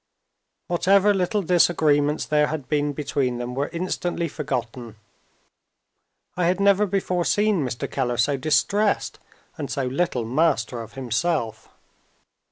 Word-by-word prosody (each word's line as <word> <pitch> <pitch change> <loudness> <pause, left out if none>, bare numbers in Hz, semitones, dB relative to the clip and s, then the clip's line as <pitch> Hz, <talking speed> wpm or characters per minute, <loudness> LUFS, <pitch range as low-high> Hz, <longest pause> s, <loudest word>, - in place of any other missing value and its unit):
Whatever 195 +3 +3
little 195 +2 0
disagreements 155 -4 +2
there 150 -1 +2
had 150 -4 -5
been 145 -1 0
between 140 -3 -2
them 120 +1 -5
were 140 +3 -1
instantly 175 0 -2
forgotten. 125 -6 -5 1.4
I 180 - 0
had 180 +2 +1
never 200 +1 +4
before 185 -2 -1
seen 205 -3 +2
Mr. 120 -2 -3
Keller 125 -3 -2
so 135 +4 +2
distressed 200 +9 +1 0.4
and 145 - -4
so 135 - -2
little 130 -2 -1
master 135 -2 0
of 115 0 -11
himself. 130 -2 -2
150 Hz, 125 wpm, -23 LUFS, 130-180 Hz, 1.4 s, never